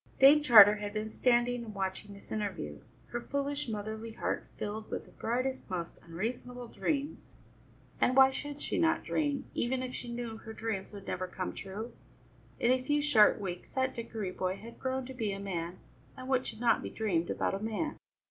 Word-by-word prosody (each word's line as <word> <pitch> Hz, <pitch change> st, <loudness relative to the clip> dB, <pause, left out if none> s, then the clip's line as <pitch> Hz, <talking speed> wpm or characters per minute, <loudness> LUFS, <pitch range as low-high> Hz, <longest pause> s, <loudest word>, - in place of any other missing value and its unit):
Dame 280 Hz, +3 st, +8 dB
Charter 210 Hz, -7 st, +9 dB
had 205 Hz, 0 st, -5 dB
been 215 Hz, +1 st, -2 dB
standing 245 Hz, 0 st, +2 dB
and 215 Hz, -3 st, -8 dB
watching 195 Hz, +1 st, -3 dB
this 200 Hz, -, -15 dB
interview, 185 Hz, -, -3 dB, 0.3 s
her 240 Hz, -, -3 dB
foolish 280 Hz, +1 st, -2 dB
motherly 220 Hz, +1 st, -4 dB
heart -, -, -2 dB
filled 215 Hz, +1 st, -4 dB
with -, -, -4 dB
the -, -, -17 dB
brightest, 255 Hz, +3 st, -2 dB
most 170 Hz, -2 st, -4 dB
unreasonable 240 Hz, +7 st, -5 dB
dreams. 290 Hz, 0 st, -3 dB, 0.6 s
And 255 Hz, -, +3 dB
why 265 Hz, 0 st, +8 dB
should 290 Hz, +2 st, -5 dB
she -, -, -1 dB
not 330 Hz, 0 st, +3 dB
dream, 290 Hz, -3 st, 0 dB
even 255 Hz, +2 st, 0 dB
if 255 Hz, 0 st, -5 dB
she 240 Hz, -, -6 dB
knew 235 Hz, -2 st, -4 dB
her 220 Hz, 0 st, -9 dB
dreams 220 Hz, -4 st, -3 dB
would 200 Hz, -2 st, -9 dB
never 185 Hz, 0 st, -2 dB
come 185 Hz, 0 st, -4 dB
true? 205 Hz, +5 st, -6 dB, 0.7 s
In 240 Hz, -, +4 dB
a 255 Hz, 0 st, +3 dB
few 290 Hz, +3 st, +1 dB
short 255 Hz, -10 st, +5 dB
weeks 180 Hz, 0 st, -6 dB
that 260 Hz, 0 st, +1 dB
Dickory 225 Hz, -4 st, -4 dB
boy 185 Hz, 0 st, -1 dB
had 230 Hz, +4 st, -11 dB
grown 260 Hz, 0 st, -2 dB
to 265 Hz, -, -7 dB
be 220 Hz, -5 st, -1 dB
a 195 Hz, -, -5 dB
man, 180 Hz, -3 st, -3 dB, 0.4 s
and 255 Hz, -, -7 dB
what 260 Hz, -1 st, +1 dB
should 220 Hz, -, -6 dB
not 235 Hz, -2 st, +3 dB
be -, -, -5 dB
dreamed 175 Hz, -7 st, 0 dB
about -, -, 0 dB
a 195 Hz, -, -1 dB
man! 225 Hz, +9 st, -2 dB
230 Hz, 195 wpm, -32 LUFS, 205-260 Hz, 0.7 s, Charter